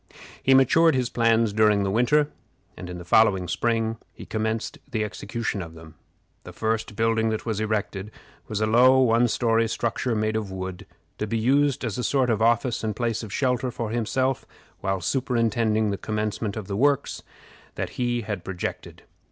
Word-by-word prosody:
He 135 - +4
matured 160 +4 +5
his 125 -2 -1
plans 115 -2 +2
during 105 -1 +3
the 95 - 0
winter, 145 +7 +2 0.4
and 90 - -8
in 90 - -6
the 90 - -9
following 95 -1 +4
spring 115 +1 0 0.2
he - - -10
commenced 110 +6 -3
the 110 -2 -1
execution 105 +1 -4
of 85 -2 -9
them. 80 -1 -13 0.5
The - - -10
first 110 -1 -2
building 115 0 +1
that 110 -1 -3
was 110 -3 -2
erected 105 -2 -2 0.4
was 105 -1 -3
a - - +3
low 125 +4 +5
one 120 -1 +4
story 115 0 +1
structure, 115 +2 -1
made 110 0 0
of 110 -3 -2
wood, 95 -1 -6 0.3
to 105 - -2
be 115 - -1
used 140 +3 +2
as 115 0 -3
a - - -2
sort 130 -3 +2
of 110 -1 0
office 115 +1 +2
and 110 -1 -2
place 115 -2 -1
of 110 -3 -8
shelter 125 0 0
for 115 -2 -4
himself 130 +3 0 0.4
while 95 -1 -2
superintending 115 -3 +1
the 100 - -3
commencement 105 0 -3
of 110 - -5
the 100 - -4
works 140 +5 +1 0.5
that - - -4
he 120 -1 0
had 105 -4 -5
projected. 90 -2 -6
110 Hz, 180 wpm, -25 LUFS, 105-120 Hz, 0.5 s, matured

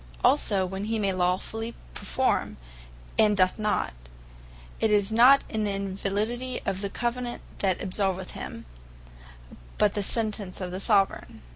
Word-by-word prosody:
Also, 195 -2 +3
when 190 +2 -4
he 225 +1 -1
may 200 -2 +1
lawfully 185 +5 -1 0.2
performe, - - 0 0.6
and 210 -2 +5
doth 185 +2 +3
not, 210 - 0 0.9
it 220 - +2
is 205 0 +2
not 250 +5 +6
the - - -8
Invalidity 205 +5 -2
of 190 - -2
the 200 - -2
Covenant, 240 +2 -3 0.2
that 190 -3 +1
absolveth 190 -1 -1
him, - - -7 1.1
but 210 -1 +3
the 205 - -1
Sentence 210 -2 -1
of 185 -2 -4
the 185 - -4
Soveraign. 195 - +1
205 Hz, 135 wpm, -27 LUFS, 190-220 Hz, 1.1 s, not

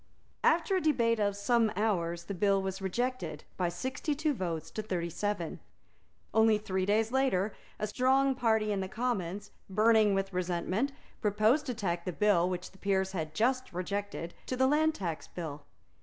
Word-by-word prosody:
After 345 +4 +3
a 370 - +2
debate 235 -8 +2
of 205 -1 +1
some 230 +1 +2
hours 175 -5 0
the 200 - -5
bill 195 +1 +2
was 190 0 -3
rejected 190 - -2
by 180 -2 0
sixty 260 - -3
two 305 +1 +1
votes 170 - -3
to 215 - -3
thirty 175 -5 -3
seven. 205 -3 -2 0.7
Only 220 -1 +5
three 190 -3 -2
days 220 +2 +2
later, 235 -7 +1 0.2
a - - -1
strong 265 +5 +3
party 220 -4 +1
in 200 - 0
the 190 - -3
Commons, 205 -4 -2 0.2
burning 215 0 +4
with 195 0 -1
resentment, 185 +8 -1 0.3
proposed 215 +8 +3
to 250 - -2
tack 175 -5 -2
the 180 - -1
bill 190 -4 +3
which 180 -1 -4
the 190 - -20
Peers 190 -1 +1
had 155 -4 -4
just 255 +3 +1
rejected 185 -1 -3
to 255 - -2
the 260 - +4
Land 310 +3 +3
Tax 170 -5 -4
Bill. 150 -4 -7
205 Hz, 170 wpm, -31 LUFS, 180-240 Hz, 0.7 s, Only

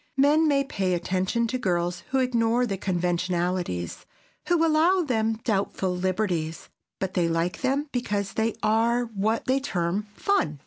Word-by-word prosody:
Men 295 +4 +4
may 280 -2 +3
pay 190 -9 -1
attention 185 +6 0
to 250 +3 -2
girls 175 -4 -1
who 270 - +1
ignore 245 -1 +2
the 200 -5 -2
conventionalities, 175 - -1 0.4
who 340 -2 +3
allow 330 +4 +3
them 225 -6 +1
doubtful 195 -3 0
liberties, 180 -3 -2 0.3
but 190 -1 -2
they 175 -2 +2
like 165 +2 -1
them 275 +3 0
because 205 -5 -2
they 220 0 0
are 230 +3 +2
what 220 0 -1
they 260 +1 +2
term 195 -5 -2
"fun." 165 - 0
210 Hz, 145 wpm, -26 LUFS, 180-255 Hz, 0.4 s, Men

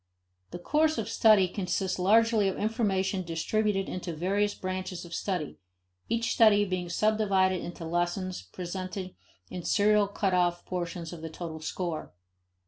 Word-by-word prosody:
The - - -6
"course 310 - +1
of 225 -2 -2
study" 215 -4 +5
consists 185 0 -2
largely 220 +2 +4
of 190 - -2
information 200 -4 0
distributed 195 +4 -1
into 175 -2 -5
various 200 +5 0
branches 185 -1 -4
of 170 - -10
study, 180 -7 -3 0.5
each 230 0 0
study 210 -2 +5
being 185 -2 -3
subdivided 195 -2 +2
into 170 -1 -7
lessons 175 - -1
presenting 185 - -6 0.4
in 180 -1 -5
serial 210 +1 +3
cutoff 180 -4 0
portions 175 -2 -4
of 165 - -9
the 160 - -5
total 160 0 -7
store. 160 - -4
185 Hz, 135 wpm, -29 LUFS, 175-210 Hz, 0.5 s, study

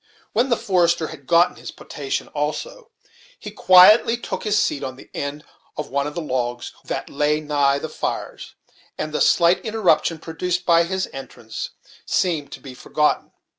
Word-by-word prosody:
When 240 +5 +2
the 235 - +2
forester 170 -4 +1
had 140 - -12
got 170 +1 +3
his - - -8
potation 140 -2 -5
also, 460 - -4 0.5
he - - -9
quietly 210 +6 +6
took 240 - -5
his 210 -1 +2
seat 145 - 0
on 130 -1 -5
the - - -16
end 145 +1 -5 0.3
of 150 - -5
one 140 +1 0
of 150 - -7
the 170 - -3
logs 120 -3 -3
that - - -4
lay 150 +2 0
nigh 145 -2 +1
the 150 - -5
fires, 155 - -5 0.4
and 155 0 -4
the - - -1
slight 170 +1 +4
interruption 200 -7 +1
produced 180 +3 -3
by 170 -1 +4
his 190 +2 -2
entrance 120 -4 -7 0.3
seemed 160 -6 -1
to - - -8
be 135 -2 -10
forgotten. 150 +4 -1
160 Hz, 170 wpm, -22 LUFS, 145-180 Hz, 0.5 s, quietly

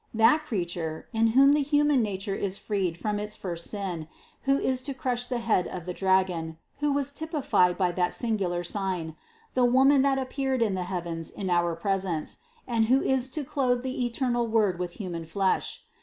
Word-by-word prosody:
That 225 +8 +5
Creature, 175 - -4
in 225 0 +3
whom 270 +5 +6
the 295 - +3
human 290 -1 +3
nature 195 -2 -2
is 195 0 -1
freed 190 -6 -2
from 210 +1 -2
its 210 0 -3
first 170 -3 -3
sin, 185 -6 -4 0.4
who 275 0 +4
is 260 -2 +1
to 275 +1 -4
crush 250 -3 -2
the 250 - -1
head 230 -6 +1
of 180 -3 -7
the 180 - -4
dragon, 185 -4 +1 0.2
who 295 0 +1
was 280 0 0
typified 285 - +1
by 180 -2 +2
that 180 0 0
singular 195 -7 0
sign, 175 -4 -2 0.4
the 255 - +2
Woman 265 +3 +5
that 275 0 +2
appeared 265 -1 -1
in 210 -4 0
the 185 -1 -2
heavens 170 -3 -4
in 190 -3 -4
our 175 -1 +2
presence, 185 -3 -2 0.3
and 230 -2 +2
who 255 +4 +4
is 265 -1 +2
to 300 +3 -2
clothe 255 -3 0
the 260 -1 -2
eternal 240 0 0
Word 210 -5 +2
with 175 -1 -3
human 175 -5 -5
flesh. 190 +4 -1
210 Hz, 185 wpm, -27 LUFS, 180-260 Hz, 0.4 s, whom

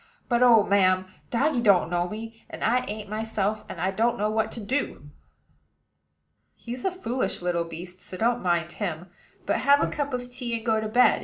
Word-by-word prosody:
But, 240 -1 +2
oh, 235 -4 +7
ma'am! 185 -2 +3 0.2
doggy 265 +1 +1
don't 195 -6 +4
know 175 0 0
me; 225 +2 -8
and - - -7
I 245 +3 +3
ain't 210 0 -5
myself, 215 0 -2
and 170 - -7
I 185 +3 +1
don't 230 +4 +1
know 210 +1 0
what 220 0 0
to - - -6
do." 250 +7 -3 1.4
"He's 245 +1 -7
a - - +2
foolish 255 - -2
little 175 -1 0
beast; 175 +2 -9
so 185 - -7
don't 235 +4 +1
mind 170 -2 0
him, 175 -3 -4 0.3
but - - +1
have 285 +1 +5
a - - -1
cup 285 -1 -2
of 245 0 -6
tea, 245 -2 -3
and 225 - -10
go 220 -2 +2
to 215 - -2
bed. 245 +4 +4
220 Hz, 200 wpm, -26 LUFS, 185-245 Hz, 1.4 s, oh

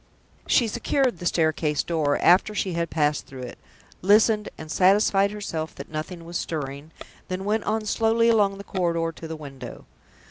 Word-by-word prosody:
She 240 - +3
secured 240 - 0
the 175 - -2
staircase 155 -3 +1
door, 155 -4 0
after 190 +4 +4
she 190 -3 -1
had 170 -1 -1
passed 150 -2 0
through 130 -1 -9
it 125 - -9 0.4
listened, 210 +2 +4
and 155 -1 -8
satisfied 195 +2 +4
herself 185 -7 -5
that - - -10
nothing 165 +2 -6
was 170 0 -4
stirring 145 -1 -5 0.4
then 185 +1 -4
went 210 +1 0
on 215 0 -1
slowly 225 +2 +2
along 205 -4 +3
the 200 - -8
corridor 170 -4 -1
to 165 0 -9
the 160 - -5
window. 140 -4 -10
175 Hz, 170 wpm, -24 LUFS, 155-210 Hz, 0.4 s, after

